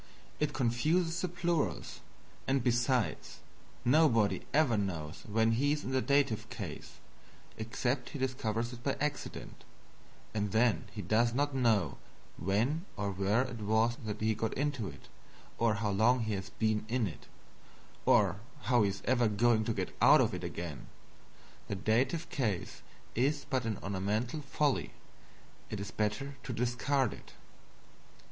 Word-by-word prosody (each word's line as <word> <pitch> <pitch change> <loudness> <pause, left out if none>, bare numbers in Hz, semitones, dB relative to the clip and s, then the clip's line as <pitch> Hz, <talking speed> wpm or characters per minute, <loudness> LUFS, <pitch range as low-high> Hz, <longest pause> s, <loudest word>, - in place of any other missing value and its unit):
It 150 -1 +1
confuses 155 +7 +1
the 185 - 0
plurals; 170 -2 -1 0.5
and, 135 -2 +2
besides, 120 - +1 0.5
nobody 120 -6 +4
ever 145 -6 +3
knows 85 -5 -3
when 110 +2 +2
he 140 +6 +2
is 150 - -3
in - - -4
the 130 0 +2
Dative 140 -6 +1
case, - - -7 0.7
except 120 +3 -1
he - - -6
discover 125 -4 -1
it 120 0 -5
by 135 +2 0
accident 150 0 -4 0.7
and 105 -1 -1
then 115 0 +3
he 105 - -6
does 115 +6 +2
not 145 +1 +1
know 115 -8 +2 0.4
when 115 - 0
or 100 -1 -1
where 100 +5 +2
it 125 -3 -6
was 110 +3 +2
that 105 -1 -4
he 110 0 +2
got 110 +1 -2
into 140 -6 -1
it, 70 -6 -11 0.5
or 115 -2 +3
how 105 -1 -1
long 115 +5 +3
he 110 -1 -1
has 95 -1 -4
been 110 -1 0
in 120 -1 +1
it, 90 - -7 0.8
or 100 -2 +4 0.3
how 120 +1 +3
he 100 - +3
is 100 0 -6
ever 120 -2 +3
going 110 +1 +3
to 115 - 0
get - - -3
out - - +8
of - - +2
it - - -4
again. 85 -5 -5 0.8
The 100 - -2
Dative 130 - +1
case 105 -10 -2 0.3
is 140 +5 +1
but 130 -4 0
an 110 -2 -1
ornamental 105 +9 -1
folly 145 -1 0 0.8
it 105 - -4
is 100 0 -5
better 110 +6 -2
to 125 - -5
discard 125 +2 +1
it. - - -13
115 Hz, 155 wpm, -32 LUFS, 105-135 Hz, 0.8 s, out